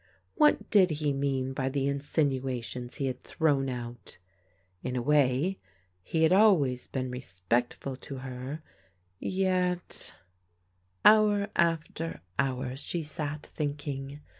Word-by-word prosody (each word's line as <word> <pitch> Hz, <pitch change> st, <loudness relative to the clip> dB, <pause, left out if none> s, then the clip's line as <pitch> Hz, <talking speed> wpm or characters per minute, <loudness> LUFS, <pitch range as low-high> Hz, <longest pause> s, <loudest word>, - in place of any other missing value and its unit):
What 300 Hz, -9 st, +3 dB
did 195 Hz, -4 st, +6 dB
he 150 Hz, -2 st, 0 dB
mean 135 Hz, -1 st, -1 dB
by 130 Hz, 0 st, -1 dB
the 135 Hz, 0 st, 0 dB
in 140 Hz, 0 st, 0 dB
sinuations 130 Hz, -4 st, -1 dB
he 140 Hz, -, -1 dB
had 130 Hz, -1 st, -3 dB
thrown 140 Hz, -4 st, +1 dB
out? 120 Hz, -1 st, -7 dB, 0.6 s
In 125 Hz, 0 st, -3 dB
a 125 Hz, -, 0 dB
way, 145 Hz, +5 st, +2 dB, 0.4 s
he 160 Hz, -, 0 dB
had 160 Hz, +3 st, +5 dB
always 170 Hz, -, +4 dB
been 130 Hz, -2 st, -3 dB
respectful 120 Hz, +3 st, -2 dB
to 135 Hz, -, -8 dB
her, 130 Hz, +4 st, -6 dB, 0.6 s
yet 185 Hz, -2 st, -1 dB, 0.9 s
Hour 210 Hz, -1 st, +6 dB
after 165 Hz, -, 0 dB, 0.2 s
hour 130 Hz, -1 st, 0 dB
she 165 Hz, +4 st, -2 dB
sat 150 Hz, 0 st, -4 dB
thinking. 145 Hz, -1 st, -4 dB
140 Hz, 120 wpm, -29 LUFS, 130-165 Hz, 0.9 s, did